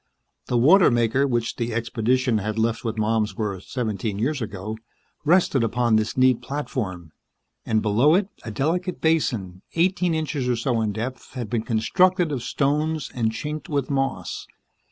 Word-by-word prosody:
The 125 Hz, -, +1 dB
water 170 Hz, +11 st, +6 dB
maker 120 Hz, +3 st, +2 dB
which 120 Hz, -3 st, -1 dB
the 115 Hz, -1 st, -2 dB
expedition 115 Hz, +1 st, +1 dB
had 105 Hz, +2 st, -3 dB
left 115 Hz, +1 st, 0 dB
with 115 Hz, -2 st, -3 dB
Malmsworth 105 Hz, -3 st, -1 dB
seventeen 110 Hz, -4 st, -2 dB
years 135 Hz, +6 st, -1 dB
ago 110 Hz, 0 st, -5 dB, 0.4 s
rested 155 Hz, -5 st, +3 dB
upon 120 Hz, 0 st, +2 dB
this 110 Hz, +2 st, 0 dB
neat 130 Hz, -2 st, +4 dB
platform, 105 Hz, -, -4 dB, 0.6 s
and 110 Hz, -1 st, +1 dB
below 120 Hz, +9 st, +4 dB
it 190 Hz, +1 st, +2 dB, 0.2 s
a -, -, -6 dB
delicate 170 Hz, -, -1 dB
basin, 115 Hz, -, 0 dB
eighteen 180 Hz, 0 st, +2 dB
inches 145 Hz, -5 st, -2 dB
or 125 Hz, -, +2 dB
so 115 Hz, 0 st, 0 dB
in 110 Hz, -1 st, 0 dB
depth, 120 Hz, +5 st, -6 dB
had 120 Hz, -4 st, -5 dB
been 115 Hz, -2 st, +1 dB
constructed 175 Hz, -, +2 dB
of 135 Hz, -4 st, -2 dB
stones 150 Hz, +4 st, -1 dB
and 115 Hz, -3 st, 0 dB
chinked 150 Hz, +8 st, -5 dB
with 145 Hz, -2 st, -1 dB
moss. 135 Hz, -1 st, -2 dB
120 Hz, 155 wpm, -24 LUFS, 110-145 Hz, 0.6 s, water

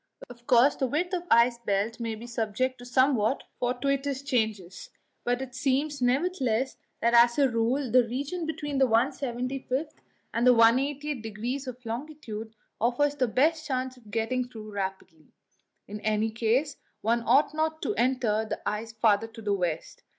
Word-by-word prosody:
Of 240 Hz, 0 st, -15 dB
course, 255 Hz, +1 st, +5 dB
the 265 Hz, -, 0 dB
width 345 Hz, +8 st, -1 dB
of 355 Hz, -1 st, -2 dB
the -, -, +6 dB
ice 235 Hz, 0 st, +4 dB
belt 215 Hz, +1 st, -1 dB
may 230 Hz, -1 st, -3 dB
be 225 Hz, +2 st, -10 dB
subject 240 Hz, +2 st, -2 dB
to 245 Hz, -, -10 dB
somewhat 255 Hz, -2 st, +2 dB, 0.2 s
fortuitous 275 Hz, +2 st, -1 dB
changes, 220 Hz, -9 st, -2 dB, 0.3 s
but 245 Hz, +2 st, 0 dB
it 255 Hz, -1 st, -9 dB
seems, 275 Hz, +2 st, 0 dB
nevertheless, 260 Hz, -2 st, +1 dB, 0.3 s
that 235 Hz, +1 st, +2 dB
as 235 Hz, 0 st, +6 dB
a 280 Hz, -2 st, +5 dB
rule 245 Hz, +2 st, 0 dB
the 250 Hz, -1 st, +5 dB
region 285 Hz, +8 st, -3 dB
between 295 Hz, -3 st, -3 dB
the 265 Hz, -, +5 dB
175th 260 Hz, +3 st, -1 dB, 0.4 s
and 235 Hz, +2 st, +2 dB
the 250 Hz, -, +7 dB
180th 270 Hz, +4 st, +3 dB
degrees 235 Hz, +5 st, -4 dB
of 250 Hz, 0 st, -8 dB
longitude 230 Hz, -3 st, -6 dB, 0.2 s
offers 250 Hz, +6 st, +2 dB
the 260 Hz, -3 st, +1 dB
best 310 Hz, +7 st, +1 dB
chance 260 Hz, -1 st, -2 dB
of 235 Hz, -4 st, -18 dB
getting 235 Hz, +3 st, -1 dB
through 215 Hz, -3 st, -9 dB
rapidly; 190 Hz, -5 st, -6 dB, 0.5 s
in 210 Hz, +1 st, -6 dB
any 215 Hz, +1 st, 0 dB
case, 235 Hz, +6 st, 0 dB, 0.2 s
one 230 Hz, +2 st, +1 dB
ought 280 Hz, +5 st, +4 dB
not 315 Hz, 0 st, -1 dB
to -, -, 0 dB
enter 240 Hz, -, +1 dB
the 220 Hz, -, -4 dB
ice 220 Hz, +2 st, -3 dB
farther 220 Hz, -1 st, +2 dB
to 225 Hz, 0 st, -12 dB
the 205 Hz, -1 st, +1 dB
west. 175 Hz, -5 st, -3 dB
245 Hz, 165 wpm, -27 LUFS, 225-275 Hz, 0.5 s, the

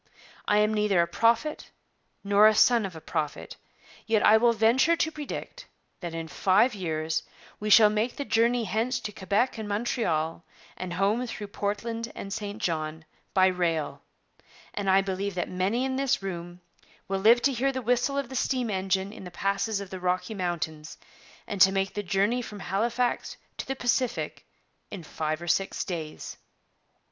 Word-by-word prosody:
I 210 Hz, -, +3 dB
am 210 Hz, +1 st, +3 dB
neither 210 Hz, -3 st, +2 dB
a 170 Hz, -, +4 dB
prophet 230 Hz, -, +1 dB, 0.5 s
nor 205 Hz, +1 st, +6 dB
a 215 Hz, -, +4 dB
son 230 Hz, -1 st, +4 dB
of 180 Hz, -, -12 dB
a -, -, -7 dB
prophet, 150 Hz, -1 st, -4 dB, 0.5 s
yet 220 Hz, -2 st, +3 dB
I 215 Hz, -, +7 dB
will 235 Hz, +1 st, +4 dB
venture 235 Hz, +9 st, +3 dB
to 320 Hz, -1 st, 0 dB
predict 305 Hz, -, -7 dB, 0.3 s
that 170 Hz, -2 st, -6 dB
in 165 Hz, 0 st, -4 dB
five 200 Hz, -, +3 dB
years 160 Hz, -4 st, -2 dB, 0.4 s
we 210 Hz, -, -3 dB
shall 210 Hz, 0 st, +8 dB
make 215 Hz, +3 st, -1 dB
the 285 Hz, -, -4 dB
journey 235 Hz, +1 st, +2 dB
hence 225 Hz, +5 st, -1 dB
to 210 Hz, -, -5 dB
Quebec 205 Hz, +5 st, 0 dB
and 215 Hz, -1 st, -5 dB
Montreal 175 Hz, -8 st, -1 dB, 0.3 s
and 180 Hz, -1 st, -5 dB
home 205 Hz, +7 st, +1 dB
through 210 Hz, -3 st, -6 dB
Portland 225 Hz, +3 st, -3 dB
and 195 Hz, -, -6 dB
St 210 Hz, -1 st, -5 dB
John, 160 Hz, -4 st, -3 dB, 0.3 s
by 185 Hz, -1 st, +6 dB
rail; 170 Hz, -5 st, 0 dB, 0.7 s
and 200 Hz, -2 st, -2 dB
I 190 Hz, +1 st, +5 dB
believe 195 Hz, 0 st, -3 dB
that 175 Hz, -, -1 dB
many 195 Hz, +8 st, 0 dB
in 260 Hz, 0 st, -2 dB
this 270 Hz, -4 st, +1 dB
room 175 Hz, -1 st, -6 dB, 0.5 s
will 195 Hz, 0 st, -1 dB
live 230 Hz, +4 st, +5 dB
to 280 Hz, -, +3 dB
hear 265 Hz, +3 st, +1 dB
the 260 Hz, -1 st, -4 dB
whistle 250 Hz, +4 st, +1 dB
of 280 Hz, -4 st, -2 dB
the 265 Hz, -, -7 dB
steam 250 Hz, -2 st, 0 dB
engine 190 Hz, +1 st, -1 dB
in -, -, -10 dB
the 180 Hz, -, -7 dB
passes 200 Hz, +3 st, -1 dB
of 200 Hz, -2 st, -8 dB
the 190 Hz, -, -5 dB
Rocky 180 Hz, +4 st, -1 dB
Mountains 160 Hz, -5 st, -4 dB, 0.5 s
and 200 Hz, -2 st, -4 dB
to 190 Hz, -, +8 dB
make 195 Hz, 0 st, -1 dB
the 205 Hz, -, -2 dB
journey 200 Hz, +6 st, +1 dB
from 210 Hz, -4 st, -8 dB
Halifax 235 Hz, +6 st, -1 dB, 0.2 s
to -, -, -5 dB
the 270 Hz, -, -2 dB
Pacific 245 Hz, 0 st, -1 dB, 0.4 s
in 180 Hz, -, -7 dB
five 155 Hz, +1 st, -3 dB
or -, -, -7 dB
six 195 Hz, +3 st, 0 dB
days.' 160 Hz, -4 st, -6 dB
205 Hz, 175 wpm, -27 LUFS, 185-235 Hz, 0.7 s, shall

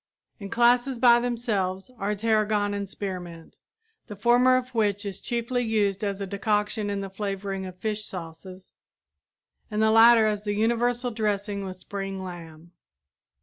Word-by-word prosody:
In 200 Hz, -1 st, -7 dB
classes 245 Hz, +3 st, +3 dB
by 240 Hz, -1 st, +6 dB
themselves 225 Hz, -4 st, -2 dB
are 205 Hz, +1 st, -1 dB
tarragon 210 Hz, -1 st, +1 dB
and 200 Hz, -1 st, -4 dB
spearmint, 175 Hz, -5 st, -7 dB, 0.5 s
the 210 Hz, -, -8 dB
former 245 Hz, +4 st, +4 dB
of 255 Hz, 0 st, -3 dB
which 205 Hz, -3 st, 0 dB
is 195 Hz, -1 st, -5 dB
chiefly 240 Hz, +1 st, -1 dB
used 210 Hz, -3 st, 0 dB
as 200 Hz, -1 st, -2 dB
a 200 Hz, -, -3 dB
decoction 210 Hz, +1 st, -1 dB
in 200 Hz, -1 st, -2 dB
the 195 Hz, -, -5 dB
flavoring 195 Hz, -1 st, -4 dB
of 185 Hz, -1 st, -10 dB
fish 215 Hz, +1 st, -3 dB
sauces, 185 Hz, +1 st, -10 dB, 1.0 s
and 210 Hz, -, -3 dB
the 220 Hz, 0 st, +4 dB
latter 225 Hz, 0 st, +7 dB
as 210 Hz, -1 st, -1 dB
the 205 Hz, -1 st, -2 dB
universal 240 Hz, +3 st, +1 dB
dressing 205 Hz, -2 st, -2 dB
with 185 Hz, -1 st, -7 dB
spring 195 Hz, +1 st, -5 dB
lamb. 170 Hz, -3 st, -9 dB
205 Hz, 150 wpm, -26 LUFS, 195-230 Hz, 1.0 s, latter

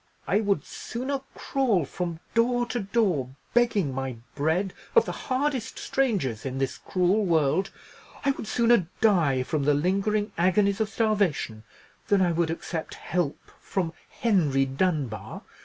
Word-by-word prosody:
"I 200 Hz, -, +2 dB
would 200 Hz, -2 st, 0 dB
sooner 265 Hz, +3 st, -4 dB
crawl 235 Hz, -, +1 dB
from 170 Hz, +2 st, -4 dB
door 240 Hz, +1 st, +2 dB
to 240 Hz, 0 st, -3 dB
door, 190 Hz, -, 0 dB, 0.2 s
begging 215 Hz, -, +2 dB
my 135 Hz, -1 st, -3 dB, 0.2 s
bread 160 Hz, +7 st, 0 dB, 0.2 s
of 465 Hz, -, +6 dB
the -, -, -3 dB
hardest 265 Hz, -, -2 dB
strangers 225 Hz, -, 0 dB
in 135 Hz, -1 st, -4 dB
this 135 Hz, -1 st, -2 dB
cruel 185 Hz, +3 st, +1 dB
world—I 175 Hz, -, -1 dB
would 245 Hz, -, -6 dB
sooner 235 Hz, -6 st, +3 dB
die 160 Hz, -12 st, +3 dB
from 150 Hz, +3 st, -1 dB
the 145 Hz, 0 st, +4 dB
lingering 200 Hz, +6 st, +1 dB
agonies 195 Hz, +3 st, +3 dB
of 215 Hz, -, 0 dB
starvation—than 195 Hz, -, -1 dB
I 180 Hz, -2 st, +3 dB
would 165 Hz, 0 st, +1 dB
accept 165 Hz, 0 st, -4 dB
help 175 Hz, -5 st, -1 dB, 0.2 s
from 175 Hz, -4 st, -2 dB, 0.2 s
Henry 155 Hz, -, +2 dB
Dunbar. 135 Hz, -, -2 dB
185 Hz, 135 wpm, -26 LUFS, 150-225 Hz, 0.2 s, of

